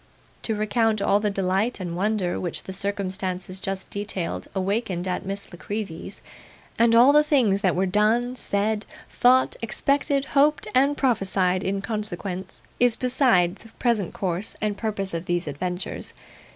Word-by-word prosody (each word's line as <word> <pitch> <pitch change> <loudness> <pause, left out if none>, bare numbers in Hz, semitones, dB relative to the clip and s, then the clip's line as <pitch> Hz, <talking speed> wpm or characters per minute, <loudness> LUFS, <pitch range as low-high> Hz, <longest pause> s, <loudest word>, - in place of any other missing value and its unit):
To 220 - -1
recount 215 +1 +1
all 200 0 +3
the 210 0 0
delight 195 +4 0
and 175 -2 -4
wonder 195 -1 0
which 175 -3 -3
the 190 - -7
circumstances 190 -2 -3
just 195 0 -4
detailed 200 -4 -3
awakened 190 -2 -1
at 185 +1 -3
Miss 195 -1 -5
La 175 - -10
Creevy's, 205 -6 -5 0.6
and 230 0 +5
all 250 +5 +7
the 300 - +7
things 245 -10 +2
that 185 -4 +2
were 185 +2 +2
done, 220 +6 +2
said, 210 -1 0 0.2
thought, 255 +1 +4
expected, 275 +4 +1
hoped, 290 +2 +3
and 275 +3 +3
prophesied 195 -7 +1
in 195 +1 -2
consequence, 195 -4 -3 0.2
is 245 -2 +4
beside 245 -9 +2
the 225 - -15
present 225 -7 0
course 185 +1 -3
and 210 -1 -1
purpose 200 -3 -3
of 165 +1 -3
these 175 0 -1
adventures. 180 +5 -3
200 Hz, 150 wpm, -24 LUFS, 185-230 Hz, 0.6 s, all